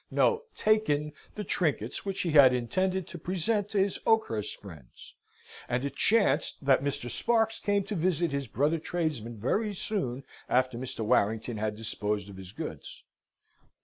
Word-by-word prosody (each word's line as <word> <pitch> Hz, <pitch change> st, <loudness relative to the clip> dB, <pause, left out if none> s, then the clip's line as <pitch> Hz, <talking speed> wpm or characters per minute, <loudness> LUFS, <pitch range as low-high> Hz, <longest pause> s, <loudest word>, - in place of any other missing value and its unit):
no; 460 Hz, -1 st, +2 dB
taken 150 Hz, -9 st, +2 dB, 0.2 s
the 210 Hz, -, -4 dB
trinkets 145 Hz, -, -1 dB
which 195 Hz, -1 st, -2 dB
he 170 Hz, -, -1 dB
had 135 Hz, -4 st, +7 dB
intended 185 Hz, +9 st, -1 dB
to 175 Hz, -, -8 dB
present 195 Hz, +5 st, -1 dB
to 210 Hz, -, -2 dB
his 195 Hz, 0 st, +1 dB
Oakhurst 220 Hz, -, +1 dB
friends; 80 Hz, -11 st, -13 dB, 0.6 s
and 125 Hz, +2 st, 0 dB
it 140 Hz, -1 st, -4 dB
chanced 210 Hz, -6 st, +2 dB
that 135 Hz, -1 st, +4 dB
Mr. 140 Hz, -3 st, -2 dB
Sparks 225 Hz, -, +1 dB
came 205 Hz, -1 st, +1 dB
to 195 Hz, -, -5 dB
visit 170 Hz, -2 st, +1 dB
his 140 Hz, -1 st, -2 dB
brother 145 Hz, +9 st, +1 dB
tradesman 150 Hz, -10 st, -3 dB
very 205 Hz, -, 0 dB
soon 140 Hz, -, -3 dB, 0.3 s
after 130 Hz, 0 st, +2 dB
Mr. 125 Hz, -1 st, -5 dB
Warrington 110 Hz, +2 st, +1 dB
had 105 Hz, 0 st, -2 dB
disposed 105 Hz, -2 st, -3 dB
of 95 Hz, -, -10 dB
his 95 Hz, -1 st, -9 dB
goods. -, -, -7 dB
145 Hz, 155 wpm, -29 LUFS, 120-195 Hz, 0.6 s, had